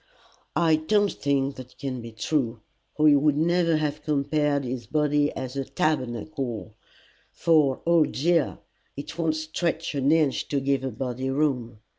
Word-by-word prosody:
"I 160 -1 +4
don't 205 +6 +2
think 140 -1 -1
that 130 -1 -11
can 130 -3 -4
be 115 0 -8
true, 115 0 -1 0.3
or 155 0 +4
he 145 - +7
would 145 0 +3
never 165 0 +2
have 150 -1 -2
compared 150 -1 0
his 125 -2 -5
body 150 -1 +2
to 130 +1 -3
a - - -2
tabernacle, 125 - -2 0.6
for, 150 -5 +2
oh 170 -2 +5
dear! 165 +3 +1 0.4
it 140 - -7
won't 160 -2 +1
stretch 160 +1 -2
an 140 0 +1
inch 155 -4 +2
to 140 - 0
give 135 0 0
a 135 - -1
body 130 0 -4
room. 130 -6 -1
145 Hz, 155 wpm, -25 LUFS, 130-155 Hz, 0.6 s, he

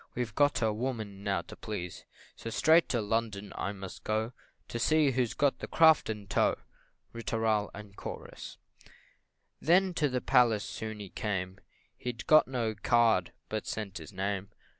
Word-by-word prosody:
We've 120 -4 -2
got 145 -2 +3
a 110 -1 +2
woman 110 -4 -4
now 95 -4 0
to - - -11
please 90 -6 -6 0.3
So 115 - -6
straight 160 +8 +4
to 120 - +1
London 105 -2 -2
I 100 - -2
must 95 -2 -9
go, 110 +3 -1 0.4
To 120 - -3
see 150 +3 +4
who's 125 -2 0
got 140 -1 +2
the - - -5
craft 160 -6 +5
in 105 -2 -4
tow. 100 - +2 0.6
Ri 115 - -6
tooral, 110 -2 0
&c. 100 -1 -10 0.7
Then 180 +3 +4
to 150 -4 +1
the 125 -1 0
palace 120 -5 +3
soon 110 -1 -6
he 100 -2 -7
came 95 -2 -3 0.4
He'd 120 -1 -5
got 155 -4 +6
no 120 -4 -1
card, 110 -3 +3 0.2
but 110 -1 -4
sent 105 -4 -4
his - - -10
name. 100 0 -2
110 Hz, 160 wpm, -30 LUFS, 100-125 Hz, 0.7 s, got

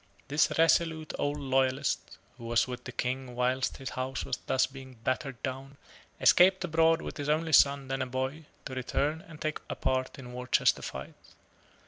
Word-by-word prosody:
This 145 +2 +3
resolute 160 -1 +2
old 145 +1 0
loyalist, 135 0 0 0.2
who 115 - -9
was 115 +1 +2
with 125 -1 -7
the 130 - -5
King 125 0 -3
whilst 125 +1 0
his 135 - -6
house 130 +1 -3
was - - -2
thus 130 - +3
being 130 -1 -11
battered 130 0 -2
down, 135 +1 -5 0.4
escaped 185 +1 +6
abroad 165 0 +3
with - - -6
his 145 -1 -3
only 160 +1 +1
son, 140 -1 +5
then 135 0 -2
a 130 - -1
boy, 130 +5 -3 0.2
to 135 - -6
return 145 +5 -1
and 155 -2 -12
take 155 -1 -2
a - - -3
part 130 0 -1
in 125 -2 -9
Worcester 125 0 +2
fight. 65 0 -7
135 Hz, 175 wpm, -30 LUFS, 130-155 Hz, 0.4 s, escaped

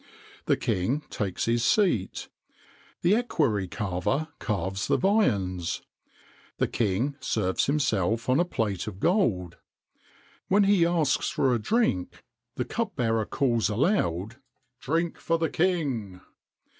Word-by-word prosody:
The - - +3
king 120 +12 0
takes 95 -4 -2
his 115 0 +1
seat. 180 - +1 0.8
The 175 +3 +4
equerry 140 - 0
carver 105 - -2
carves 100 -2 -2
the - - +3
viands. 100 - +1 0.7
The - - +1
king 120 +6 -1
serves 95 -4 0
himself 115 -6 0
on 130 +3 +3
a - - +5
plate 110 - -2
of 100 -3 -6
gold. 115 - +1 0.9
When 200 +2 +4
he 195 -4 +4
asks 165 -6 +1
for 130 -3 +1
drink, 100 - 0 0.3
the 125 - -2
cup 230 -2 -3
bearer 115 -4 0
calls 120 -6 +1
aloud: 110 - 0 0.4
"Drink 165 +5 -1
for 165 - 0
the 165 -1 -1
king!" 135 - -1
120 Hz, 120 wpm, -27 LUFS, -, 0.9 s, a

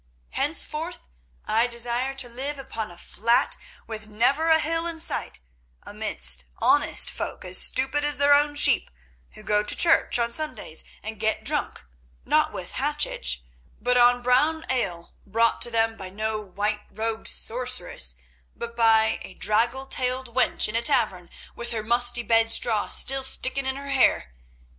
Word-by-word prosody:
Henceforth, 320 +2 0 0.4
I 225 +3 +2
desire 240 +2 -1
to 265 -2 -1
live 270 +5 -5
upon 225 -5 -6
a 175 - -13
flat 235 +6 0 0.3
with 215 -1 -8
never 265 +10 +1
a 320 - +6
hill 330 +2 0
in 335 -1 -5
sight, - - -1 0.5
amidst 60 0 0
honest - - +2
folk - - -5
as 185 0 0
stupid 270 +3 +1
as 295 -1 0
their 285 +1 +4
own 290 0 +3
sheep, 290 - +3 0.4
who - - -13
go 210 0 +2
to 210 - 0
church 330 -6 +3
on 235 -1 -1
Sundays 310 +4 -2 0.2
and 220 -1 -7
get 220 0 0
drunk, - - -2 0.4
not - - +2
with - - -7
hachich, - - 0 0.4
but 250 +2 0
on 245 0 +4
brown 295 +6 +2
ale, 175 -9 -3
brought 230 +3 +1
to - - +1
them 225 -1 0
by 190 -1 -8
no 215 +2 -2
white 210 +2 -3
robed 220 +1 -2
sorceress, 245 - +1 0.4
but 235 0 -7
by 225 -1 +3
a 185 - -11
draggle 235 +6 0
tailed 255 -2 -3
wench 255 0 +1
in 215 - -6
a 230 - +1
tavern, 215 - 0 0.3
with 235 0 -6
her 225 -2 -4
musty 240 +1 +2
bedstraw 225 -1 +2
still 270 0 +1
sticking 265 0 +1
in 265 - 0
her 280 0 -8
hair. 260 - +2
235 Hz, 155 wpm, -24 LUFS, 220-270 Hz, 0.5 s, a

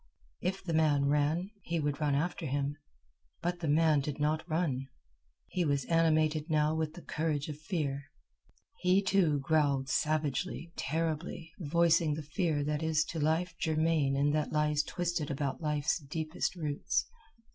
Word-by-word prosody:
If 190 +2 -2
the 170 -3 -3
man 150 -3 +3
ran, 150 +6 +1
he 170 -2 -2
would 145 0 -1
run 145 -2 +2
after 160 +2 -1
him; 140 +1 -1 0.7
but 175 +1 -1
the 165 - -3
man 155 0 +4
did 140 +1 -4
not 155 +2 +1
run. 150 -5 0 0.6
He 180 - -1
was 140 -4 +1
animated 155 -1 +2
now 155 0 +2
with 160 -1 -2
the 175 - -10
courage 150 -2 -1
of 150 -1 -6
fear. 145 -5 -2 0.7
He, 185 +2 +3
too, 180 -7 +3
growled, 140 -2 +2
savagely, 155 +3 -1
terribly, 160 +2 -2
voicing 165 -1 +3
the 155 - -5
fear 150 0 0
that 150 +1 -1
is 160 -1 +2
to 165 - -3
life 160 +3 +1
germane 155 -3 +2
and 145 +1 +2
that 155 -1 0
lies 150 -1 +2
twisted 175 -1 -2
about 140 0 -2
life's 150 +1 0
deepest 155 +4 -3
roots. 150 -4 -1
155 Hz, 155 wpm, -31 LUFS, 145-165 Hz, 0.7 s, man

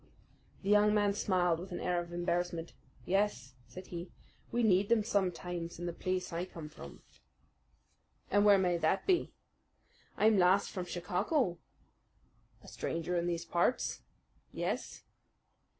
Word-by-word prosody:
The 195 - -2
young 210 0 +5
man 205 -1 +3
smiled 180 -4 +1
with 185 +2 -8
an 175 - -4
air 180 -1 0
of 170 0 -9
embarrassment. 175 -1 -2 0.3
"Yes," 195 -9 0
said 185 0 -10
he, 170 +1 -5 0.4
"we 240 0 +1
need 200 -1 +3
them 230 -2 +4
sometimes 180 -5 -2
in 175 - -5
the 175 - -3
place 185 0 -2
I 170 +1 -1
come 165 -4 -8
from." 70 - -12 1.3
"And 205 +1 +4
where 205 -1 +7
may 180 -2 +2
that 170 +4 +1
be?" 365 -2 +2 0.9
"I'm 215 -1 +4
last 185 +2 +4
from 185 -3 -4
Chicago." 180 - -1 1.0
"A - - -14
stranger 170 +2 -3
in 170 0 0
these 170 -1 -2
parts?" 175 +10 0 0.5
"Yes." - - -3
180 Hz, 140 wpm, -33 LUFS, 175-205 Hz, 1.3 s, where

